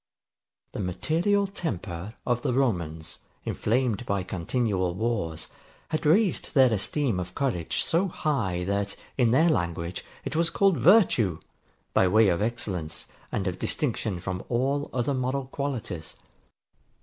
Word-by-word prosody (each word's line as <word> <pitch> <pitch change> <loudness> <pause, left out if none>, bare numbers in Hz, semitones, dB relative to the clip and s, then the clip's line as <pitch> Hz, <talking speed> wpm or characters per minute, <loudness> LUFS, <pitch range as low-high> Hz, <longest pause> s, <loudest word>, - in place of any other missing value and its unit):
The - - -6
material 165 - +1
temper 105 - -5
of 120 -1 +1
the 125 - 0
Romans, 85 - -1 0.3
inflamed 120 -1 0
by 100 -2 0
continual 95 0 -1
wars, 100 -7 -2 0.4
had 155 -1 -1
raised 185 +2 +2
their 130 -4 +6
esteem 110 +1 0
of 90 0 -6
courage 115 - 0
so 175 +4 +2
high, 115 - -1
that, 100 +1 -1 0.2
in 125 -3 +3
their 160 +8 +5
language, 85 - -2 0.2
it - - -3
was 165 +1 +3
called 195 -3 +3
VIRTUE, 130 - +5 0.5
by 95 - +4
way 110 +2 +5
of 85 +1 +1
excellence 105 -8 -2 0.3
and 95 - -1
of 90 -1 -2
distinction 110 - -1
from 90 +1 -4
all 135 +4 0
other 130 +2 0
moral 130 +1 -1
qualities. 125 - -4
115 Hz, 135 wpm, -27 LUFS, 90-140 Hz, 0.5 s, their